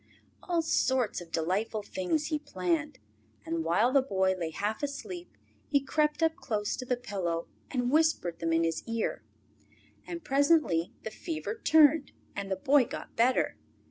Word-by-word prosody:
All 340 -2 0
sorts 260 - +1
of 170 -1 -12
delightful 200 +7 -1
things 245 - -1
he 305 -2 0
planned, 180 - -2 0.5
and 165 0 -2
while 180 +10 +3
the 275 - +6
Boy 190 -7 +1
lay 170 -3 -3
half 205 +7 -3
asleep 345 +5 -6 0.3
he 285 - +4
crept 300 +3 0
up 320 0 +3
close 210 -5 -2
to 255 - -5
the 250 - +1
pillow 180 -8 -3 0.2
and 245 -2 -1
whispered 305 - +2
them 165 0 -1
in 165 0 +3
his 165 0 0
ear. 230 -1 -2 0.8
And 340 -1 -6
presently 275 - +3
the 220 - -5
fever 325 - -4
turned, 310 -7 +4 0.2
and 200 -1 -4
the 190 - 0
Boy 265 +7 +4
got - - -8
better. 245 +3 +2
240 Hz, 160 wpm, -30 LUFS, 185-300 Hz, 0.8 s, the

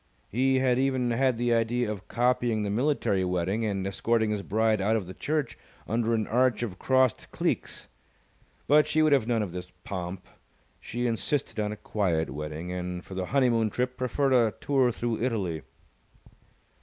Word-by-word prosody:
He 130 +4 +2
had 130 -1 +2
even 130 -2 +1
had 130 0 +2
the 120 0 +1
idea 115 0 +1
of 100 -2 -7
copying 120 -3 +1
the 100 - -2
military 115 -5 +1
wedding 90 +4 -1
and 100 -3 -1
escorting 110 +3 +1
his 105 -2 -1
bride 110 +1 +1
out 110 +3 +2
of 105 -4 -1
the 90 - -8
church 145 0 -2 0.3
under 115 +1 +1
an 110 -1 0
arch 125 +2 +2
of 95 -6 -5
crossed 130 -2 +2
cleeks. - - -2 0.8
But 150 +1 +5
she 155 +1 +2
would 155 -2 +4
have 130 -5 +3
none 115 -3 +1
of 95 - -5
this 90 +1 -6 0.2
pomp. 90 -1 -5 0.5
She 120 +1 -4
insisted 120 +2 -1
on 105 0 0
a 105 - -6
quiet 85 -10 -1
wedding, 75 +4 -5
and 90 0 -4
for - - -9
the 95 -1 -3
honeymoon 120 -5 +2
trip 125 +4 -2
preferred 130 +2 0
a 115 -4 +3
tour 135 -3 +2
through 115 -1 -2
Italy. 100 -10 -1
115 Hz, 175 wpm, -27 LUFS, 100-125 Hz, 0.8 s, But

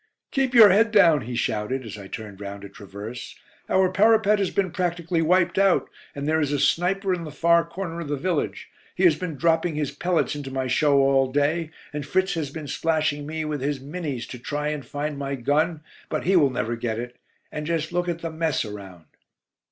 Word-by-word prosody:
"Keep 270 -3 0
your 220 -3 +10
head 220 +4 +4
down," 170 - +5
he 125 +1 -5
shouted, 115 +3 -2
as 110 - -7
I 100 -2 -9
turned 105 -1 -8
round 100 0 -7
a 100 - -8
traverse. 105 +3 -9 0.3
"Our 190 -1 +3
parapet 215 +1 +4
has 195 -3 +1
been 190 -3 -1
practically 170 -1 -1
wiped 175 +2 +2
out, 195 -2 +3 0.2
and 140 0 -4
there 160 +1 +2
is 145 -2 0
a 145 - 0
sniper 190 +6 +1
in 175 -2 -3
the 155 - -6
far 170 +3 +3
corner 170 0 -6
of 165 - -5
the 145 0 -2
village. 180 +5 -2 0.3
He - - -1
has 360 - +6
been 180 -5 -5
dropping 165 +3 +1
his 150 -2 -2
pellets 175 -3 0
into 145 -2 -6
my 130 0 -2
show 140 +2 +3
all 135 -1 +3
day, 150 +4 +1 0.2
and 150 0 -3
Fritz 190 +6 0
has 155 -4 -3
been 155 +1 -7
splashing 155 -1 -1
me 160 0 -3
with 150 -3 -3
his 140 0 -1
'Minnies' 140 -3 -5
to 125 - -8
try 150 +4 -3
and 150 -2 -4
find 145 +3 -4
my 140 0 -3
gun, 150 +5 0 0.3
but - - -2
he 190 +2 +2
will 150 -6 +5
never 120 -2 -2
get 115 -1 -3
it. 120 +1 -6 0.4
Just 160 +1 -2
look 175 0 0
at 170 -1 -3
the 165 - -3
mess 160 -5 -1
around." 95 -5 -10
150 Hz, 210 wpm, -24 LUFS, 135-175 Hz, 0.4 s, your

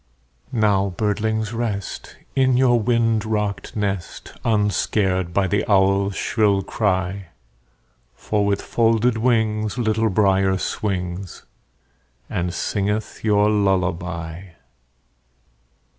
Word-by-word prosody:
Now, 100 -4 +1
birdlings, 110 +1 -1
rest, 110 -5 -4 0.2
In 130 -2 +3
your 125 -2 +4
wind 115 -1 +1
rocked 105 -2 -3
nest, 100 -5 -4
Unscared 100 -4 +1
by 95 +3 +1
the 100 +1 0
owl's 100 0 +3
shrill 100 -4 +1
cry; 95 -2 -1 0.9
For 105 - -1
with 100 0 0
folded 115 0 +2
wings 110 -3 +1
Little 110 -1 +1
Brier 95 -1 +2
swings, 95 -2 -4 0.9
And 90 0 -1
singeth 105 +3 -2
your 105 -1 +3
lullaby. 90 -3 -1
105 Hz, 95 wpm, -22 LUFS, 95-110 Hz, 0.9 s, your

